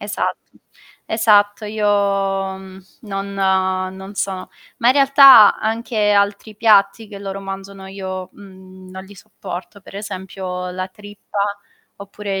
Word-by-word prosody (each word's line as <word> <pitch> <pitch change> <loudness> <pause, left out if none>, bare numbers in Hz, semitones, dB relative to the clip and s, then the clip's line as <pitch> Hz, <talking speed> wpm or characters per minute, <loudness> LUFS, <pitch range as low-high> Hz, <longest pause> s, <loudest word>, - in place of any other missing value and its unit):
Esatto, - - -4 0.5
esatto. 210 -1 +2
Io, 210 0 -4
mhmm, 195 -2 -1 0.2
non, 195 -2 -5
uhm, 190 -1 0
non 190 +2 -10
sono 190 -2 -4 0.3
ma 235 - +2
in - - +6
realtà 275 -5 +7
anche 220 -1 -1
altri 205 +1 0
piatti 210 0 +3
che 200 -1 -9
loro 195 0 -6
mangiano, 195 0 -8
io, 185 -1 -6
mhmm, 185 -1 -15
non 190 0 -9
li 200 +1 -15
sopporto, 195 0 -9
per 195 - -13
esempio 185 -2 -6
la 185 +1 -4
trippa, 205 +1 -10 0.6
oppure 200 0 -6
195 Hz, 130 wpm, -19 LUFS, 190-210 Hz, 0.6 s, realtà